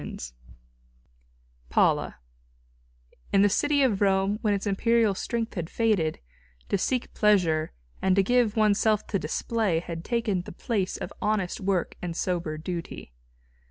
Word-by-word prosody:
IV - - -7 1.4
PAULA - - +2 1.2
In 195 - +5
the 205 - +5
city 285 +7 +2
of 215 -7 +1
Rome 195 +1 +2
when 210 -3 +2
its 200 - -4
imperial 220 +1 +2
strength 230 +3 -3
had 175 -4 -4
faded, 210 -9 +1 0.5
to - - +2
seek 250 +5 -1
pleasure 175 -7 +2 0.3
and 190 -1 +3
to 195 - +4
give 240 0 +2
one's 215 -2 +3
self 215 -2 +2
to 200 - -1
display 195 +3 -1
had 165 -1 -6
taken 225 -5 0
the - - -10
place 195 -1 -2
of - - -6
honest 205 -4 0
work 190 -2 -1
and 170 -2 -4
sober 170 -4 -2
duty. 165 - -6
200 Hz, 145 wpm, -26 LUFS, 175-220 Hz, 1.4 s, In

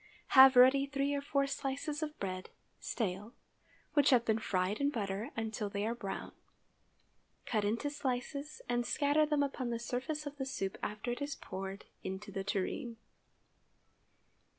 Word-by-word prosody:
Have 265 -1 +9
ready 260 +3 +7
three 280 0 0
or 285 - 0
four 280 0 +1
slices 280 +2 -3
of 305 0 -4
bread 185 -1 -4 0.3
(stale) 210 +1 -3 0.6
which 290 -2 +5
have 245 -4 +5
been 220 0 +2
fried 185 -1 0
in 280 - +3
butter 205 -4 -3
until 220 -2 -2
they 200 +1 -2
are 230 - 0
brown; 200 -5 -5 1.1
cut 215 -3 0
into 230 +8 0
slices 285 +2 -3
and 240 0 +1
scatter 290 +4 +2
them 295 -1 +2
upon 270 -3 -2
the 235 - -1
surface 260 +6 -3
of 290 0 -6
the 265 - -2
soup 195 -8 -3
after 210 +4 -3
it 245 - -4
is 285 0 -2
poured 195 +1 -6 0.2
into 190 +2 -5
the 195 -1 -3
tureen. 205 +4 -2
245 Hz, 155 wpm, -34 LUFS, 210-280 Hz, 1.1 s, Have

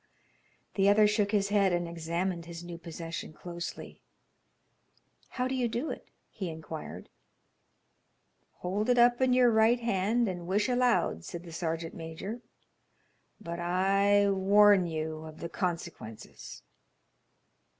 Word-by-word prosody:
The 195 0 +3
other 210 +1 +6
shook 210 -1 +1
his 200 -2 +1
head 200 -2 +3
and 175 -1 0
examined 170 +1 -3
his 170 0 -8
new 175 -1 -8
possession 165 -1 -7
closely. 170 +1 -8 1.3
"How 250 0 -2
do 260 - -3
you 255 -2 0
do 235 +7 -3
it?" - - -8 0.2
he 190 -5 -5
inquired. 160 -1 -8 1.5
"Hold 200 +6 -1
it 245 - +4
up 240 +1 +5
in 260 -1 +3
your 250 -1 +5
right 225 +2 +4
hand 230 +1 +1
and 175 -2 -5
wish 205 +3 +1
aloud," 245 - +1
said 170 - -7
the 170 - -11
sergeant 165 0 -3
major, 170 +8 -7 1.0
"but 170 -4 -6
I 195 +3 +3
warn 195 0 +5
you 160 -1 -3
of 155 0 -10
the 170 - -5
consequences." 165 - -6
190 Hz, 130 wpm, -30 LUFS, 170-215 Hz, 1.5 s, other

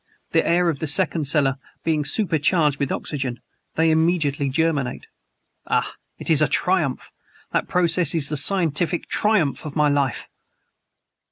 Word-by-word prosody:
"The - - +2
air 175 +1 +1
of 155 -5 -1
the 160 - -3
second 155 0 +2
cellar 135 -2 +1 0.2
being 155 -3 0
super 165 0 0
charged 150 -2 +1
with 140 - -2
oxygen, 130 -5 -3 0.4
they 160 0 +2
immediately 160 -3 +1
germinate. 145 -3 -1 0.6
Ah! - - -1 0.2
it - - -10
is 155 -2 +4
a 150 - +4
triumph! 175 -8 -1 0.4
That - - -1
process 170 -2 +2
is 150 -4 +1
the 150 - -2
scientific 170 +1 +1
triumph 210 -10 +1
of 150 -2 -8
my 150 -1 +2
life!" 140 -4 -1
155 Hz, 150 wpm, -22 LUFS, 140-170 Hz, 0.6 s, is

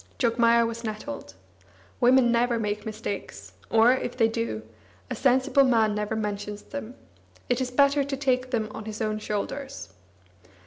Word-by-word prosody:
Jogmaya 235 -1 +3
was 230 +1 -5
nettled. 220 +6 -6 0.6
Women 250 -1 +5
never 235 0 +2
make 210 0 -3
mistakes, 200 - -6 0.2
or, 225 +2 +5
if 255 -1 -3
they 225 -3 +4
do, 225 - -3 0.5
a - - -1
sensible 265 +1 +3
man 225 -5 +3
never 210 +1 -2
mentions 205 -1 -4
them; 255 -3 -7 0.5
it 245 +1 +1
is 255 - -1
better 280 +2 +3
to 275 0 -3
take 255 -2 0
them 225 -4 -1
on 215 - -8
his 215 -1 -6
own 215 -1 -1
shoulders. 215 - -4
235 Hz, 150 wpm, -26 LUFS, 215-255 Hz, 0.6 s, Women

